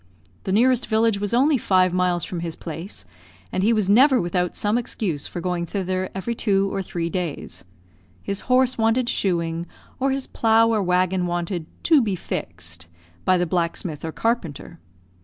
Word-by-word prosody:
The - - -1
nearest 250 +4 +3
village 220 -2 +2
was 205 0 -2
only 270 +3 +3
five 185 -3 +3
miles 180 -2 +1
from 175 - -5
his 165 -1 -4
place, 165 - -7 0.5
and 185 - -1
he 215 +4 +3
was 215 -4 +2
never 255 +6 +6
without 180 -1 -1
some 205 +1 0
excuse 195 - -2
for 175 - -6
going 175 -1 -2
thither 185 0 -2
every 195 +5 -2
two 195 -3 +1
or 195 - -1
three 170 -2 -3
days. 170 -3 -4 0.6
His 200 0 -3
horse 255 -1 +3
wanted 225 +2 +2
shoeing, 170 -2 -1 0.3
or 270 +1 +2
his 270 0 -1
plough 225 0 +3
or 215 - +2
waggon 180 0 +1
wanted 175 -1 -3 0.2
"to 315 -4 +5
be 205 -5 0
fixed" 85 - -6 0.4
by 185 - +4
the 175 - +1
blacksmith 170 -2 -2
or 160 - -3
carpenter. 170 - -2
185 Hz, 170 wpm, -23 LUFS, 170-225 Hz, 0.6 s, never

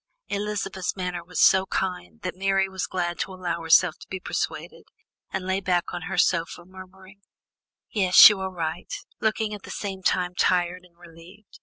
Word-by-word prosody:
Elizabeth's 200 -2 -3
manner 180 -2 -4
was 180 +1 -6
so 190 0 +5
kind, 90 - -4
that - - -3
Mary 195 0 +1
was 190 -1 -4
glad 175 -1 -3
to - - -3
allow 175 -2 -4
herself 165 +1 +4
to - - -13
be 190 - -5
persuaded, - - -5 0.4
and 190 -1 -4
lay 190 +1 0
back 180 -2 -1
on 175 - -4
her 195 - -4
sofa 170 0 0
murmuring: 190 +1 -14 0.7
"Yes, 185 -4 +8
you 210 -2 +2
are 190 0 -3
right," 170 -1 -5 0.3
looking 220 -1 -1
at 205 - -7
the - - -12
same 195 -2 -5
time 180 -1 0
tired 180 0 0
and 170 -1 -25
relieved. 175 +4 -16
185 Hz, 175 wpm, -25 LUFS, 175-190 Hz, 0.7 s, Yes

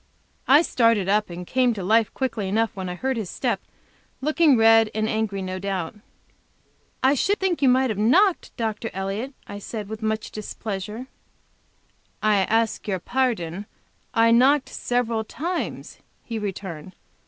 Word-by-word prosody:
I 290 +5 +7
started 230 - +2
up 210 +1 +2
and 175 +1 -7
came 250 +2 +2
to 195 - -5
life 220 +3 +3
quickly 230 -7 -2
enough 225 +2 0
when 190 -2 -4
I 180 - -4
heard 260 +6 -2
his 210 -5 -4
step, - - -1 0.6
looking 305 -1 +3
red 225 0 +6
and 215 0 0
angry, 215 -3 -1
no 185 0 -4
doubt. 190 -4 -3 1.1
"I 265 +1 +5
should 395 +9 +1
think 375 -4 0
you 270 - +5
might 260 -1 +3
have 205 - -4
knocked, 350 - +3
Dr. 225 0 -2
Elliott," 200 +8 -4
I 205 - -8
said, 210 0 -6
with 220 0 -6
much 220 0 -2
displeasure. 215 +1 -5 1.1
"I 215 -1 +3
ask 220 +4 +1
your 195 -2 0
pardon; 205 -5 -2 0.4
I 230 0 +4
knocked 265 +4 +4
several 235 -2 -1
times," 340 +10 -4 0.2
he 230 -2 -4
returned. 190 -3 -6
220 Hz, 155 wpm, -24 LUFS, 200-255 Hz, 1.1 s, I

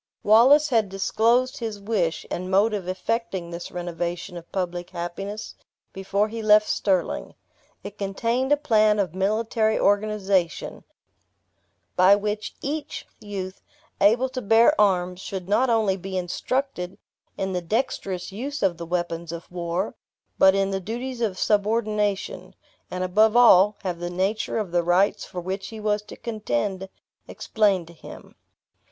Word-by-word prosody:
Wallace 265 +8 +6
had 225 -6 +2
disclosed 230 +6 +1
his 220 -3 -4
wish, 200 -6 -1
and 185 +1 -3
mode 200 +4 +3
of 195 -4 -3
effecting 190 -2 -3
this 170 0 -6
renovation 175 +1 -4
of 170 -1 -10
public 175 -2 -3
happiness, 195 +4 -6 0.4
before 195 +2 0
he 225 +1 -6
left 215 0 +5
Stirling. 190 -3 -1 0.5
It 205 - -9
contained 230 +7 -1
a 290 - +5
plan 215 -7 +3
of 190 -5 -1
military 215 +3 0
organization, 200 -4 0 1.1
by 185 +2 +6
which 210 +1 -3
each 295 +1 -4
youth, 195 -2 -6 0.4
able 230 +6 +4
to 255 0 -5
bear 225 +6 +5
arms, 180 -3 +1
should 190 -2 -6
not 245 +6 +2
only 215 -4 +2
be 190 0 -5
instructed 185 +2 -3 0.4
in 190 0 -2
the 180 - -1
dexterous 190 -2 -2
use 270 +8 -5
of 180 -3 +2
the 170 0 -7
weapons 170 -1 -3
of 170 0 -8
war, 175 +2 -2 0.5
but 190 0 +6
in 195 0 +1
the 195 0 -2
duties 240 +5 -5
of 205 -5 -1
subordination, 210 -1 0 0.3
and 185 0 -3
above 215 +5 +3
all, 210 -4 +6
have 180 -3 -3
the 175 0 -4
nature 190 +6 -1
of 210 -5 -3
the 175 0 +2
rights 175 +4 +2
for 180 - -6
which 190 +2 -4
he 220 +1 -8
was 210 -1 0
to 210 - -12
contend 190 - -3 0.4
explained 200 -5 0
to 170 - -14
him. 165 - -12
200 Hz, 145 wpm, -24 LUFS, 180-220 Hz, 1.1 s, Wallace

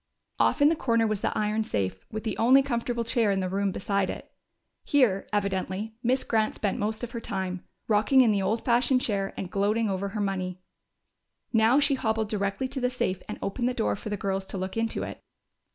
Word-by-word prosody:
Off 285 - +3
in 290 - +7
the 330 - +2
corner 230 -6 +2
was 215 -2 -1
the - - -1
iron 215 +1 +1
safe, 95 - -3
with 215 0 -4
the 220 -4 -2
only 260 +4 +6
comfortable 235 -2 -1
chair 230 -2 +1
in 195 - +1
the 185 - -1
room 195 +1 0
beside 200 0 -1
it. - - -7 0.5
Here, 245 -9 +2
evidently, 200 +1 -2
Miss 255 +2 +1
Grant 220 -1 +1
spent 205 -2 -1
most 215 +3 -2
of 240 - -4
her 235 - -4
time, 185 -4 -4 0.2
rocking 220 +5 +4
in 235 -4 +5
the 200 -1 +1
old 215 +4 -1
fashioned 250 +1 +3
chair 195 -4 -1
and 185 - -5
gloating 210 +2 +1
over 195 +1 -2
her 210 +2 -5
money. 185 -2 -2 0.9
Now 225 +4 +5
she 280 -1 +3
hobbled 220 -4 0
directly 200 +4 -1
to 270 0 -4
the 250 - +2
safe 190 -7 -2
and 210 - -4
opened 240 +5 -1
the 250 - -3
door 105 -1 0
for 210 - -7
the 205 - -2
girls 195 0 -2
to - - -5
look 190 0 -4
into 225 0 -1
it. - - -7
215 Hz, 215 wpm, -27 LUFS, 195-235 Hz, 0.9 s, in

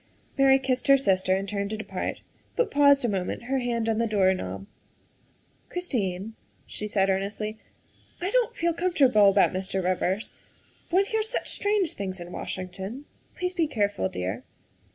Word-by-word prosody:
Mary 270 -1 +6
kissed 260 -1 -1
her 275 0 +7
sister 185 -6 +2
and 195 +1 -3
turned 200 0 -2
to 215 - -3
depart, 215 - -4 0.3
but 485 - +1
paused 280 -2 +5
a - - +3
moment, 195 +1 -2
her 265 +2 0
hand 235 -2 -1
on 225 -1 +1
the 230 - +2
door 195 -3 +3
knob. 95 - -5 0.6
" - - -37
Christine," 220 - -2 0.3
she 210 - -6
said 195 -2 +2
earnestly, 205 +3 -2 0.3
" - - -32
I 365 +3 -2
don't 485 0 +2
feel 340 -4 +1
com 355 +2 -1
fortable 230 - +6
about 195 -1 +4
Mr. 190 0 -2
Rivers. 185 +3 -1 0.6
One 380 +3 +3
hears 440 +1 -1
such - - -2
strange 405 -4 +1
things 190 -2 -5
in 175 0 -8
Washington. 190 +10 -5 0.3
Please 360 0 -2
be 335 -3 +1
careful, 205 - 0
dear." 90 +1 -4
215 Hz, 175 wpm, -26 LUFS, 190-280 Hz, 0.6 s, her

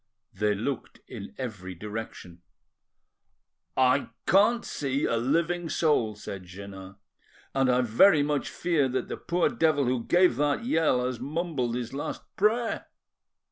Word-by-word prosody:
They 105 -2 +1
looked 125 +5 -4
in - - -9
every 95 -8 -6
direction. 105 -3 -7 1.4
"I 130 +2 +3 0.2
can't 210 +5 +4
see 140 0 -1
a 115 - +1
living 165 +7 0
soul," 145 -9 +1
said 100 -2 -7
Jeannin, 95 +1 -10 0.6
"and 135 -1 +2
I 125 0 +4
very 145 - +5
much 145 -1 -1
fear 155 -6 +1
that 130 - -2
the - - -4
poor 175 0 +1
devil 160 - +2
who 125 -1 0
gave 175 -5 +3
that 145 +10 +1
yell 160 - +2
has 125 -2 -3
mumbled 140 -3 -2
his 120 0 -4
last 140 - -4
prayer." 225 +3 +1
130 Hz, 140 wpm, -27 LUFS, 115-165 Hz, 1.4 s, very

